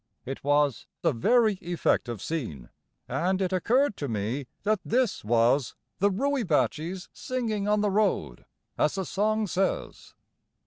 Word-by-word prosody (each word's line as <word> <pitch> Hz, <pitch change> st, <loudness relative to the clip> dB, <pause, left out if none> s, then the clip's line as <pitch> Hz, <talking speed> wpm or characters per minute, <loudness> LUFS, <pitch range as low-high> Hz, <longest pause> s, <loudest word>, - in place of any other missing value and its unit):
It 135 Hz, +1 st, -6 dB
was 145 Hz, -2 st, +2 dB, 0.2 s
a -, -, +3 dB
very 215 Hz, -, +3 dB
effective 145 Hz, -, 0 dB
scene, 95 Hz, -, -4 dB, 0.4 s
and 185 Hz, +2 st, 0 dB
it 190 Hz, -1 st, 0 dB
occurred 240 Hz, +6 st, +2 dB
to 145 Hz, -, -3 dB
me 115 Hz, +4 st, -2 dB, 0.2 s
that 215 Hz, 0 st, +2 dB
THIS 245 Hz, -2 st, 0 dB
was 120 Hz, +4 st, +2 dB, 0.2 s
"the 200 Hz, +2 st, +4 dB
rooibaatjees 190 Hz, -, 0 dB
singing 225 Hz, -5 st, -2 dB
on 210 Hz, 0 st, +3 dB
the 205 Hz, -1 st, +1 dB
road," 200 Hz, -, 0 dB, 0.3 s
as 150 Hz, -, +2 dB
the 190 Hz, -1 st, -2 dB
song 215 Hz, +3 st, +1 dB
says. 190 Hz, 0 st, -2 dB
185 Hz, 135 wpm, -27 LUFS, 140-215 Hz, 0.4 s, the